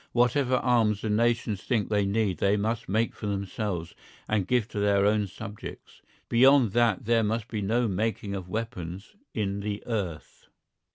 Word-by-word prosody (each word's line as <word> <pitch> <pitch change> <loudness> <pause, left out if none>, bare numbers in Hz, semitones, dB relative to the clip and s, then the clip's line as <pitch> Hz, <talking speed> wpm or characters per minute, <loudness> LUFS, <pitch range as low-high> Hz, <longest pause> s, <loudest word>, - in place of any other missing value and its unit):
Whatever 125 +2 +3
arms 115 -5 +2
the 110 - -1
nations 115 -2 +1
think 110 0 0
they 105 -2 +1
need 100 -2 0
they 100 +1 +3
must 110 +2 -2
make 110 +4 +1
for 105 - -6
themselves 100 -3 -3 0.3
and 105 -4 0
give 125 -4 +2
to 105 - -4
their 100 -1 +3
own 105 0 +2
subjects. 105 +2 -9 0.3
Beyond 130 -1 +5
that 120 -3 +2
there 115 0 +3
must 110 +1 -1
be 110 -4 -3
no 115 +4 +1
making 105 0 -2
of 95 -2 -5
weapons 105 - -5 0.2
in 100 -3 -1
the 100 0 -4
earth. 95 -10 -5
105 Hz, 165 wpm, -27 LUFS, 100-115 Hz, 0.3 s, Beyond